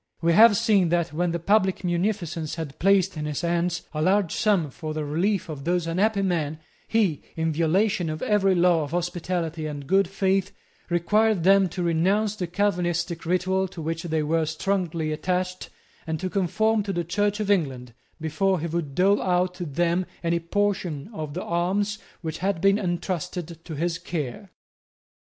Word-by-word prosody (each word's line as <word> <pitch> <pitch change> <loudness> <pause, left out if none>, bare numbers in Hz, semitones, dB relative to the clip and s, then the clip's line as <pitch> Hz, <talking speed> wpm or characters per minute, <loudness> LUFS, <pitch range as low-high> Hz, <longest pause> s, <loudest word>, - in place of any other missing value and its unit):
We 170 0 +2
have 220 +1 +7
seen 195 -6 +3
that, 170 -1 0
when 175 +3 0
the 170 - -1
public 190 +2 +2
munificence 175 -3 -1
had 160 -5 -6
placed 195 -1 +3
in 150 - -3
his 150 -2 -3
hands 175 0 0
a 155 - -2
large 190 +1 +2
sum 195 - +1
for 155 +2 -6
the 155 -1 -2
relief 175 +7 0
of 150 -4 -7
those 175 +1 0
unhappy 195 +5 +1
men, 160 -5 -1 0.3
he, 200 -10 +1
in 160 0 0
violation 170 +3 +1
of 155 0 -4
every 195 -3 +3
law 175 -2 +4
of 145 - -4
hospitality 175 -1 -2
and 145 -2 -6
good 195 +4 +3
faith, 195 0 0 0.4
required 205 +3 +2
them 195 0 +5
to 180 +1 -4
renounce 190 +6 +1
the 180 -4 -3
Calvinistic 175 -3 -1
ritual 185 +2 +1
to 180 - -11
which 165 +1 -3
they 160 -3 -1
were 160 +1 +1
strongly 165 -1 -1
attached, 180 +3 -2 0.4
and 160 -1 -2
to 185 0 -3
conform 215 +3 +1
to 200 -1 -3
the 175 -1 -1
Church 205 +5 0
of 205 -1 0
England, 130 - -1 0.3
before 165 +4 0
he 160 - -3
would 165 -4 -3
dole 195 +3 +3
out 180 0 +1
to 175 -2 -6
them 175 +4 0 0.2
any 170 0 +1
portion 185 -3 -1
of 155 -5 -5
the 180 - -3
alms 195 +5 0 0.2
which 160 -2 -5
had 190 -1 0
been 195 +3 +3
entrusted 175 -2 -3
to 160 - -7
his 170 +3 -1
care. 155 +3 -5
175 Hz, 175 wpm, -25 LUFS, 160-195 Hz, 0.4 s, have